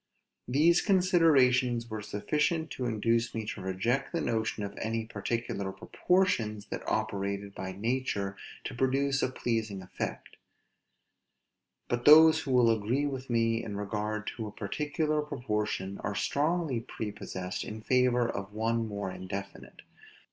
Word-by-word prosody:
These 155 +7 +4
considerations 140 - +4
were 110 -2 -5
sufficient 150 +10 -1
to 125 - -3
induce 115 +1 +1
me 110 -1 -3
to 105 -1 -5
reject 105 +9 -1
the 170 - -1
notion 110 -5 -1
of 100 - -5
any 115 0 -1
particular 115 -4 -3
proportions 110 - 0
that - - -3
operated 100 0 -2
by 95 -1 -5
nature 100 -2 -1 0.3
to - - -5
produce 135 +2 +1
a - - +1
pleasing 115 -6 -2
effect; 95 - -6 1.5
but 120 0 -2
those 160 +1 +9
who 145 -4 -4
will 125 -2 +5
agree 120 +7 0
with 135 -2 -4
me 115 -1 +2
with 110 -3 -6
regard 105 +1 -3
to 110 -2 -4
a - - -7
particular 150 +8 -1
proportion, 105 -9 -3
are 105 - -3
strongly 150 -1 0
prepossessed 95 -5 -5
in 110 +1 -7
favor 125 -1 +3
of 100 -2 -5
one 115 +1 0
more 100 -2 -4
indefinite. 100 +2 -7
115 Hz, 135 wpm, -30 LUFS, 105-135 Hz, 1.5 s, those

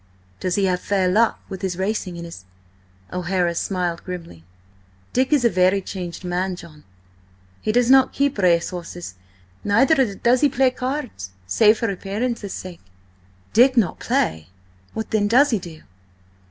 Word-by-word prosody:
"Does 180 -1 -1
he 200 - +2
have 180 -1 +1
fair 195 -1 0
luck 220 +5 +2
with 190 - -7
his 185 -3 -2
racing 190 -2 -2
and 170 - -7
his—" 165 - -10 0.7
O'Hara 180 -1 0
smiled 175 -1 -2
grimly. 170 - -8 0.7
"Dick 260 +2 +1
is 285 -5 +3
a - - +8
very 185 -2 +3
changed 185 -2 -7
man, 180 +1 -2
John. 165 -4 -14 0.8
He 215 - 0
does 245 +2 +3
not 265 -1 +6
keep 280 -5 0
racehorses, 175 - 0 0.5
neither 245 +1 +3
does 245 +4 +2
he 290 - +5
play 260 0 +2
cards, 255 - -4 0.2
save 215 - +4
for 230 -3 -1
appearance's 205 +2 -3
sake." 180 -2 -8 0.7
"Dick 255 +3 +5
not 215 -7 +2
play! 80 0 -1 0.5
What 220 - -4
then 210 -2 +2
does 265 +7 +4
he 220 - +1
do?" 165 -3 -11
195 Hz, 155 wpm, -22 LUFS, 175-235 Hz, 0.8 s, a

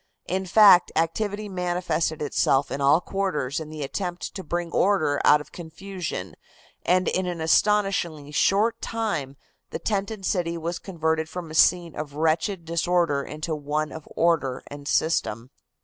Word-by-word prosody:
In 190 +1 -2
fact, 195 -2 +7
activity 205 +6 -1
manifested 175 -4 -1
itself 140 -1 +1
in 140 - -3
all 140 +5 +4
quarters 180 -9 -2
in 155 -1 -7
the 155 -1 -6
attempt 175 +5 -4
to 190 - -6
bring 170 +1 -3
order 155 -8 +2
out 150 0 +6
of 150 - -13
confusion, 170 - -6 0.5
and 185 +1 +2
in 185 0 0
an 175 -2 -4
astonishingly 170 -4 +1
short 215 +9 +2
time 180 - -3 0.3
the - - -4
tented 200 -1 -3
city 170 -3 -1
was 170 +1 -4
converted 160 -3 -2
from 175 -3 -7
a - - -8
scene 170 0 +3
of 145 -1 -6
wretched 165 +3 0
disorder 170 -3 +1
into 155 +3 -5
one 150 +1 -2
of 160 -1 -9
order 150 -7 +1
and 145 0 -9
system. 130 -8 0
170 Hz, 150 wpm, -25 LUFS, 150-185 Hz, 0.5 s, fact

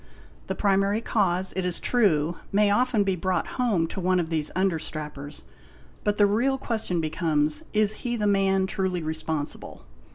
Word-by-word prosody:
The - - -2
primary 200 +1 +2
cause, 190 -5 0
it 190 - -1
is 180 -1 -2
true, 175 -9 +2
may 205 0 +3
often 240 -1 +2
be 195 -1 0
brought 180 0 -1 0.2
home 205 -10 +2
to - - -5
one 185 0 +2
of 170 -1 -3
these 155 -2 0
under 185 -3 +1
strappers; 150 -2 -6 0.6
but 210 0 0
the 205 - +6
real 240 +7 +2
question 220 -9 -2
becomes,—lIs 160 +6 +1
he 240 -1 -3
the 210 -3 -1
man 195 -1 +2
truly 190 -3 -2
responsible 155 -1 -4
190 Hz, 160 wpm, -26 LUFS, 160-210 Hz, 0.6 s, the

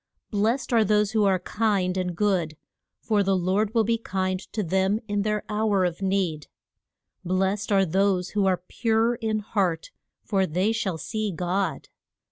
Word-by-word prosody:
Blest 225 +5 0
are 225 -2 +5
those 210 0 +2
who 215 -2 +2
are 190 -1 +3
kind 190 -1 0
and 180 -2 -2
good, 180 -7 0 0.5
for 210 -2 +2
the 195 -1 +2
Lord 200 +5 0
will 225 - +4
be 230 +1 0
kind 185 -3 -2
to 215 - -2
them 190 +4 +1
in 205 -1 0
their 210 0 -1
hour 210 -2 +1
of 175 +1 -3
need. 190 -6 -1 0.8
Blest 190 +3 0
are 195 -1 +4
those 185 +1 +1
who 205 -2 +1
are 180 -2 0
pure 225 0 +1
in 220 -2 -2
heart, 185 -6 -1 0.3
for 195 -3 +1
they 185 +7 +1
shall 200 -6 -2
see 215 +5 -3
God. 180 -2 -2
195 Hz, 165 wpm, -25 LUFS, 185-215 Hz, 0.8 s, are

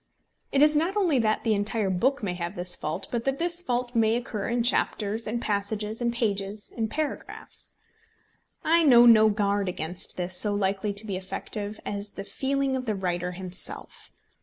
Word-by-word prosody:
It 280 +1 +4
is 300 0 +5
not 340 +7 +1
only 345 -10 +2
that 215 -2 +1
the 225 - +2
entire 205 0 0
book 255 +8 +1
may 185 -3 -1
have 175 +2 -5
this 180 -1 +1
fault, 155 +5 -4
but 235 -1 -1
that 270 0 0
this 345 +2 +1
fault 245 -5 -2
may 225 -1 +3
occur 225 -4 -3
in 235 0 +1
chapters, 225 -3 +2
in 230 +2 -2
passages, 210 +1 -2
in 240 - +1
pages, 205 -3 -2
in 225 -2 -1
paragraphs. 305 +6 -5 0.9
I 335 +1 +4
know 245 -6 +7
no 220 -2 +7
guard 200 -2 0
against 175 0 -2
this 180 0 -1
so 205 +3 +1
likely 200 +1 0
to 200 +2 -2
be 195 -3 -3
effective 205 +2 -5
as 205 0 -4
the 195 - -6
feeling 270 +4 -1
of 255 -1 -4
the 215 - 0
writer 180 -1 -2
himself. 185 0 -5
215 Hz, 185 wpm, -26 LUFS, 195-245 Hz, 0.9 s, know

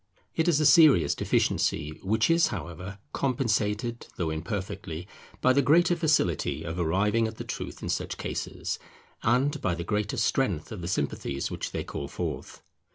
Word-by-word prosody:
It 160 - +1
is 160 -4 +4
a 155 - +2
serious 145 - +7
deficiency, 75 -1 0
which 110 - +2
is, 165 0 +5
however, 90 0 -6 0.2
compensated, 115 -3 0
though 85 -3 -1
imperfectly, 85 0 -4 0.3
by 130 - +5
the 140 - +4
greater 170 +6 +4
facility 150 - +1
of 80 +2 -4
arriving 100 +7 +2
at 110 - -8
the - - -5
truth - - -6
in - - -3
such - - -2
cases, - - -4 0.4
and 135 +6 +2
by 90 - 0
the 85 - -4
greater 105 +2 -1
strength 100 - 0
of 105 -5 -6
the 85 - -4
sympathies 70 -5 -2
which - - -3
they - - -3
call 70 - -5
forth. 75 -4 -5
105 Hz, 160 wpm, -28 LUFS, 85-135 Hz, 0.4 s, serious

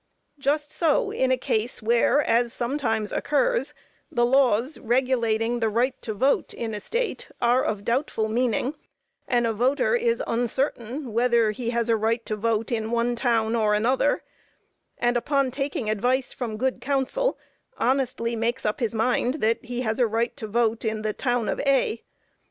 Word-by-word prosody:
Just 290 +2 0
so 320 -4 +1
in 260 - +1
a 260 - +3
case 230 -1 -1
where, 235 +6 +3
as 235 +1 +2
sometimes 235 -5 -1
occurs, - - 0 0.4
the 240 0 +2
laws 255 +1 +2
regulating 235 -2 +1
the 225 -1 +1
right 240 +4 +1
to 220 - -4
vote 270 +7 +1
in 225 -2 -4
a 210 - -3
State 465 - -3
are 245 +2 +3
of 210 -2 -2
doubtful 235 -3 0
meaning, 245 +4 0 0.5
and 240 -1 +2
a 225 - 0
voter 280 - +2
is 470 0 +1
uncertain 245 +1 -2
whether 235 -2 +3
he 235 +2 -4
has 235 -1 0
a 230 - +3
right 225 +2 0
to 215 - -2
vote 225 +2 -1
in 220 -2 -1
one 235 +1 0
town 230 -2 +1
or 215 -2 +2
another, 240 +5 +1 0.7
and, 240 0 +1
upon 275 +1 +1
taking 275 -3 -3
advice 245 +5 0
from 230 -4 -4
good 260 +3 -1
counsel, 280 - 0 0.4
honestly 245 -2 0
makes 235 +3 -1
up 210 - 0
his 230 -2 -1
mind 245 +3 +1
that 230 -5 0
he 245 +1 -4
has 220 -1 -1
a 245 - +4
right 230 +2 -1
to 225 -6 -6
vote 225 +1 0
in 220 -1 -2
the 215 -1 -1
town 245 -2 -1
of - - -1
A. 270 -5 +1
240 Hz, 170 wpm, -25 LUFS, 225-260 Hz, 0.7 s, a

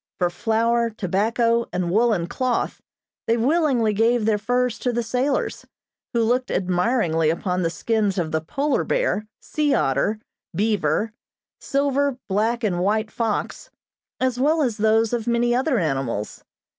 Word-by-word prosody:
For 175 -1 +1
flour, 230 +4 +1
tobacco 230 +4 0
and 180 -1 -1
woolen 215 -4 +2
cloth 250 +7 -2 0.5
they 230 - +2
willingly 255 -4 +2
gave 225 +2 +2
their 215 -1 +2
furs 245 +2 0
to 250 - 0
the 240 0 -1
sailors, 250 +5 -1 0.5
who 235 -1 +2
looked 250 +3 +1
admiringly 180 -3 +1
upon 180 +2 -1
the 165 - +1
skins 210 +1 -1
of 165 -3 -1
the 160 - 0
polar 280 - -1
bear, - - 0
sea 295 -2 0
otter, 140 +11 +1 0.4
beaver, 205 -1 0 0.5
silver, 280 -1 0
black 220 +4 0
and 185 -5 0
white 215 +3 0
fox, 225 -3 -3 0.5
as 255 -1 0
well 305 +3 +3
as 240 -5 -1
those 220 +1 +2
of 235 -1 -2
many 240 0 +2
other 260 +2 +1
animals. 135 - -2
225 Hz, 145 wpm, -23 LUFS, 190-245 Hz, 0.5 s, well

